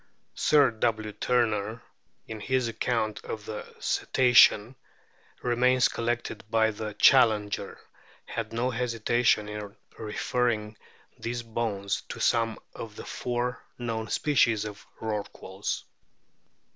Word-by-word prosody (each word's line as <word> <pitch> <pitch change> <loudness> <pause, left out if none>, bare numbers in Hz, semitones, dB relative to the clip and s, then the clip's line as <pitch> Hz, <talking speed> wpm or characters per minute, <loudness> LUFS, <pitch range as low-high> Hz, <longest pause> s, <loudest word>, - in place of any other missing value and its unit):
Sir 145 -4 +4
W. 110 -1 -1
Turner, 110 -1 0 0.4
in 110 -1 -6
his 130 +2 0
account 115 -1 -1
of 105 -2 -6
the 110 -1 -5 0.2
Cetacean 125 -2 +4 0.7
remains 125 +1 +3
collected 115 -2 -3
by 110 -1 +3
the 105 0 -6
Challenger, 110 -4 +4 0.5
had 115 -2 -4
no 120 +3 0
hesitation 115 -2 +1
in 105 0 -7 0.2
referring 110 0 -1 0.4
these 120 +1 -3
bones 110 -4 -2
to - - -6
some 115 -1 +2 0.2
of 110 -2 -8
the - - -8
o - - -12
four 125 0 -3
known 115 -2 -3
species 115 -4 +2
of 105 -1 -9
Rorquals. 105 -2 -4
115 Hz, 110 wpm, -28 LUFS, 105-120 Hz, 0.7 s, Sir